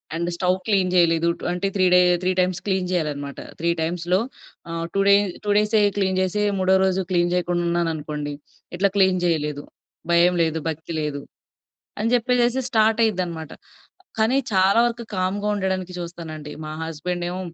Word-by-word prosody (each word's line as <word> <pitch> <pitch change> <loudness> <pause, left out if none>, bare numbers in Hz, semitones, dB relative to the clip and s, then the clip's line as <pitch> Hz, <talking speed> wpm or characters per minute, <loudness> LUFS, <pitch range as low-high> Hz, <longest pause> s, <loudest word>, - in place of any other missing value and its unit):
And 170 +1 -2
stove 180 +1 +1
clean 195 -4 +2
జేయలేదు. 170 -1 +3 0.2
అంటే 180 +2 -1
three 190 -2 +3
day 180 - +7 0.2
three times 185 -1 0
clean 190 -2 0
జేయాలన్నమాట. 145 -5 -3 0.2
Three 170 - 0
టైమ్స్‌లో 175 +3 0 0.5
ఆహ్, 165 0 -3
టూ 195 - +2
డే 200 - +8 0.3
2 205 - 0
డేసె 210 +1 +3 0.2
క్లీన్ 190 -1 +1
జేసి 195 +3 0 0.2
3 190 0 +3
రోజు 190 0 +1
క్లీన్ 175 -1 +2
జేయకుండా 175 -1 0
ఉన్నాననుకోండి, 155 -3 -2 0.4
"ఇట్లా 200 +2 +3
క్లీన్ 190 -2 +3
జేయలేదు, 150 -4 -1 0.5
భయం 175 +1 +5
లేదు, 160 0 -1
భక్తి 160 +2 -6
లేదు," 145 -2 -3 0.8
అని 220 +2 0
జెప్పేసేసి 245 +1 +2
స్టార్ట్ 220 -1 +3
అయ్యిద్దనమాట. 175 -7 -2 0.7
కానీ 225 +5 +3 0.2
చాలా 195 +2 +4
వరకు 235 0 -3
కామ్‌గా 190 +3 -1
ఉండడానికి 190 -2 -2
చూస్తానండి. 165 -3 -7
మా 155 - -6
హస్బెండేమో 175 +3 -4
180 Hz, 145 wpm, -23 LUFS, 165-195 Hz, 0.8 s, డే